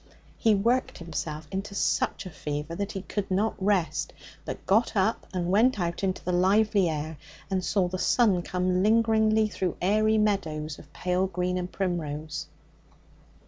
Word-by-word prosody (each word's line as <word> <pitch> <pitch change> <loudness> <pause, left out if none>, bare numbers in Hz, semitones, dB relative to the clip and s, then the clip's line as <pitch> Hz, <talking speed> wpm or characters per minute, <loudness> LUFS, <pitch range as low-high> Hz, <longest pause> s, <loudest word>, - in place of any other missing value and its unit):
He 220 -3 +3
worked 235 +6 +1
himself 160 -2 -5
into 195 +1 -4
such 200 - 0
a 185 - -7
fever 150 +1 -4
that 200 +4 -3
he 195 -2 -5
could 205 0 -3
not 200 +4 +1
rest, 190 -4 +1 0.3
but - - -6
got 225 +4 +2
up 200 +3 +1
and 180 -1 -1
went 220 +3 +4
out 170 +1 -2
into 190 -1 -1
the 180 - 0
lively 195 +1 +3
air, 155 0 -4 0.3
and 185 -1 0
saw 185 0 +1
the 185 +1 -4
sun 205 -6 +3
come 180 +1 0
lingeringly 220 0 +3
through 185 -4 -3
aery 215 +4 +3
meadows 160 -8 -1
of 145 - -15
pale 180 +3 0
green 180 0 -1
and 180 0 -3
primrose. 155 -4 -3
185 Hz, 160 wpm, -27 LUFS, 175-210 Hz, 0.3 s, went